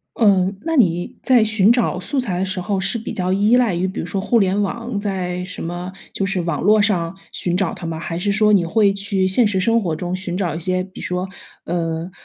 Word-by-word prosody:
嗯， 195 -3 +3
那 330 0 -2
你 175 - +1
在 250 -4 +5
寻 215 -1 +5
找 240 -6 +1
素 275 +8 -1
材 205 -9 -2
的 185 - 0
时 190 -1 -3
候 195 +1 -1
是 200 +5 0
比 225 - -6
较 185 0 -1
依 210 +5 +4
赖 240 -6 +2
于 175 +2 0
比 190 - -5
如 - - -3
说 190 +3 -3
互 235 - +2
联 195 0 +1
网 230 +2 -3
在 180 -3 -3
什 185 0 -7
么 175 +2 -5 0.2
就 - - -2
是 195 -1 -1
网 165 -4 -2
络 215 +4 +4
上 190 -4 +1 0.2
寻 175 0 0
找 190 -3 0
它 170 - -7
吗？ 165 -1 -4
还 165 +1 -4
是 200 +3 0
说 210 +1 +3
你 190 - +4
会 200 +3 +2
去 195 -1 0
现 215 +5 +3
实 195 -2 0
生 230 +4 +2
活 170 -5 -2
中 175 +3 -3
寻 185 -1 -3
找 175 -6 -1
一 165 - -4
些， 185 +1 0
比 185 0 -11
说， 180 +1 -3 0.4
呃， 165 0 -3
190 Hz, 260 characters per minute, -20 LUFS, 180-210 Hz, 0.4 s, 在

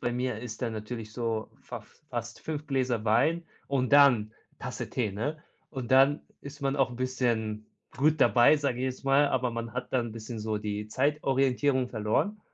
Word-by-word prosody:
bei 120 - -1
mir 125 -2 -2
ist 115 0 -7
dann 115 -2 -1
natürlich 110 0 -6
so 115 -2 -2
fas - - -8 0.2
fast 120 -2 -5
5 155 -1 -5
Gläser 125 -5 0
Wein 165 +10 +2 0.2
und 135 -1 0
dann 125 -7 +6 0.3
Tasse - - -5
Tee, 115 -5 -1
ne? 150 +9 -3 0.3
Und 130 -4 -6
dann 135 +3 +5 0.2
ist 140 0 -10
man 135 0 0
auch 135 -2 +2
'n 120 - -8
bisschen 115 -4 -1 0.3
gut 150 +2 +2
dabei, 125 +5 +6
sage 140 -4 -1
ich 130 - -1
jetzt 130 +1 -4
mal, 140 +1 +4
aber 125 -2 0
man 115 -1 -5
hat 125 +1 -5
dann 120 -2 +1
'n - - -9
bisschen 115 +1 -7
so 110 0 -2
die 105 0 -4
Zeitorientierung 135 0 +1
verloren. 115 - -1
125 Hz, 185 wpm, -29 LUFS, 115-140 Hz, 0.3 s, dann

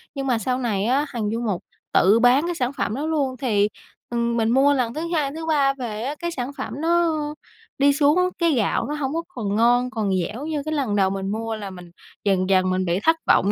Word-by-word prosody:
nhưng 270 -1 -3
mà 245 -3 +2
sau 250 +4 -1
này 210 -5 -1
á 270 +5 +2
Hằng 220 -4 -2
Du 230 +1 -2
Mục 205 -7 -2 0.3
tự 200 +5 +5
bán 245 +5 +5
cái 350 - -2
sản 255 -3 -1
phẩm 215 -4 -2
đó 290 - -3
luôn 280 -5 -1
thì, 210 -6 +2 0.4
ừm, 235 0 0
mình 225 0 +1
mua 275 +3 +4
lần 245 -3 0
thứ 310 - -4
2, 285 -4 0
thứ 320 +1 -6
3 280 -4 +2
về 230 -5 -5
á, 285 +3 -3
cái 345 0 -3
sản 260 -3 -4
phẩm 260 - -5
nó 340 0 +3 0.7
đi 280 +1 +4
xuống, 310 +5 +3
cái 335 -2 +3
gạo 225 -6 +1
nó 295 - -3
hông 280 -1 -2
có 335 +1 -2
còn 215 - -3
ngon, 245 +3 +3
còn 220 -6 -2
dẻo 245 +8 -6
như 310 -2 -2
cái 310 - -2
lần 260 -9 0
đầu 190 -2 +3
mình 195 0 -3
mua, 225 +1 -3
là 205 -2 -6
mình 180 -2 -11 0.3
dần 190 -2 +1
dần 185 -1 +3
mình 185 0 0
bị 175 +2 0
thất 325 +1 +4
vọng 200 - +4
245 Hz, 245 wpm, -23 LUFS, 210-285 Hz, 0.7 s, tự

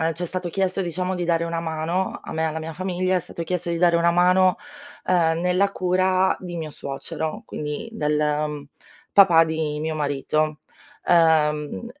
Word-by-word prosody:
ehm, 165 +1 +1
c'è 175 +2 -4
stato 180 0 -3
chiesto, 190 +1 -1
diciamo 180 +1 -2
di 175 -1 -2
dare 170 -1 +1
una 165 0 -2
mano 165 +3 -2
a - - -7
me 160 - -1
e - - +1
alla 160 0 -3
mia 160 0 -6
famiglia 185 +1 -1
è 180 - +1
stato 170 0 -7
chiesto 175 +1 -3
di 170 - -1
dare 170 0 +4
una 170 0 +3
mano, 180 +1 +4 0.5
ehm, 165 -2 +2
nella 180 +3 +2
cura 185 +1 +2
di 175 -2 -6
mio 160 -2 -5
suocero, 140 +3 -5
quindi 150 +10 -5
del, 150 -7 0
uhm, 150 -1 -1 0.5
papà 175 -5 +7
di 160 -2 -2
mio 155 0 -2
marito. 150 +1 -1 0.5
Uhm, 160 +1 +2
170 Hz, 180 wpm, -23 LUFS, 155-180 Hz, 0.5 s, papà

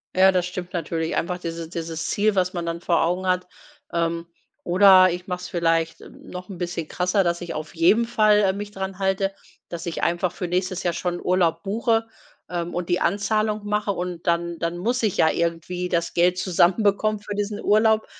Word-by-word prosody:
Ja, 190 +1 +6
das 180 -1 +1
stimmt 180 +1 -6
natürlich, 165 -1 -2
einfach 180 +1 -1
diese 165 -2 -6
dieses 165 -2 -4
Ziel, 210 0 +1
was 185 -1 +1
man 175 -2 -3
dann 170 0 -4
vor 170 - +2
Augen 180 +3 -1
hat. 180 0 +1 0.5
Ähm, 170 0 -1 0.4
oder 185 0 +7
ich 180 +1 -4
mache 180 -1 -3
es 180 - -6
vielleicht 165 -2 0
noch 180 +2 -10
‘n 185 - -7
bisschen 170 -2 -4
krasser, 180 +2 +1
dass 170 0 0
ich 175 -1 -5
auf 155 0 -6
jeden 190 +8 +4
Fall, 215 -3 +4
äh, 195 -2 +3
mich 205 +1 -6
dran 190 -1 -5
halte, 195 0 0 0.4
dass 170 0 -6
ich 170 - -4
einfach 175 +1 0
für 180 - -4
nächstes 185 +1 -1
Jahr 175 -1 0
schon 175 +1 -3
Urlaub 170 -2 +1
buche, 225 +2 0 0.4
ähm, 175 -1 -3
und 175 0 -3
die 175 - +2
Anzahlung 210 +3 0
mache 210 0 0
und 180 -2 -5
dann 170 0 0
dann 170 +1 -2
muss 240 +8 -1
ich 215 -5 0
ja 160 - +4
irgendwie 170 +2 -2
das 170 -1 -1
Geld 180 +1 +3
zusammenbekommen 205 +4 +2
für 205 0 -6
diesen 205 0 -3
Urlaub, 220 +1 +3
180 Hz, 200 wpm, -23 LUFS, 170-200 Hz, 0.5 s, oder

